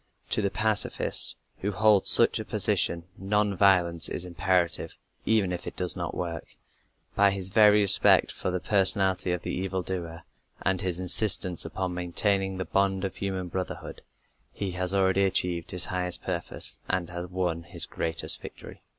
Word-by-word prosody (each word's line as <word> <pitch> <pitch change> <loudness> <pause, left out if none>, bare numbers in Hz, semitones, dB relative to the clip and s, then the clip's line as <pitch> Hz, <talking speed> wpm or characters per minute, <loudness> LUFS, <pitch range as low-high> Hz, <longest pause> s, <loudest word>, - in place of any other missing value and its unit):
To - - +2
the 100 - 0
pacifist 110 0 +1 0.2
who 105 - -3
holds 105 0 +3
such - - +6
a - - -4
position, 85 -1 +1 0.2
non 105 +1 0
violence 90 -3 +3
is 90 - -4
imperative 90 0 -1 0.3
even 105 -5 +1
if 90 -1 -6
it - - -7
does 90 -3 +3
not - - -5
work. 85 -3 -6 0.6
By 100 0 +3
his 95 -1 -4
very 105 +1 +5
respect 100 - +5
for - - -4
the 90 0 -2
personality 95 -2 +2
of 90 -1 -3
the - - -4
evil 95 0 -3
doer, 85 -3 -6 0.4
and 95 -1 0
his 90 -2 -2
insistence 90 -1 +2
upon 90 +2 -4
maintaining 95 +2 -1
the 95 - -4
bond 95 +2 0
of 95 - -6
human 95 -2 -4
brotherhood, 90 +1 -6 0.5
he 100 -2 -5
has 90 0 0
already 95 0 +2
achieved 90 -3 -1
his 90 -1 +1
highest 90 -1 -2
purpose 85 -2 -3
and 90 -2 -2
has 85 0 -6
won 90 -2 -3
his 85 +1 -4
greatest 80 0 0
victory. - - -12
95 Hz, 165 wpm, -26 LUFS, 90-100 Hz, 0.6 s, such